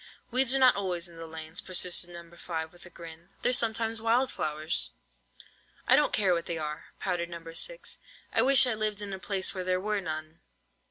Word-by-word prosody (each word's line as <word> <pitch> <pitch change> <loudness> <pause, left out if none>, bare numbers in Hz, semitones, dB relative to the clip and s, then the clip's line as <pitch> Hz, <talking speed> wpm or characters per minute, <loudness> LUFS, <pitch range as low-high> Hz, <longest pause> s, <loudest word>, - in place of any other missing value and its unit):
"Weeds 255 +1 +5
are - - +4
not 260 -2 +6
always 185 -4 -2
weeds - - -11
in 170 - -15
the 165 0 -8
lanes," 160 0 -8
persisted 180 -1 +1
No. 170 -1 -10
5, 160 -2 -5
with 175 0 -15
a - - -12
grin: 170 0 -12
"they're 250 - +4
sometimes 225 -1 +2
wild 240 +3 +2
flowers." 155 +1 -1 0.9
"I - - +6
don't 295 - +3
care 195 -4 +2
what 170 -1 -2
they 170 - -3
are," 150 0 -5
pouted 175 -2 -2
No. 165 -1 -9
6. - - -2 0.3
"I - - +3
wish 270 0 +7
I 250 - +1
lived 215 -1 -1
in 200 -1 -4
a 190 - -5
place 190 0 0
where 185 -2 -4
there 185 0 0
were 210 +1 -1
none." 155 -2 -6
180 Hz, 210 wpm, -28 LUFS, 165-215 Hz, 0.9 s, wish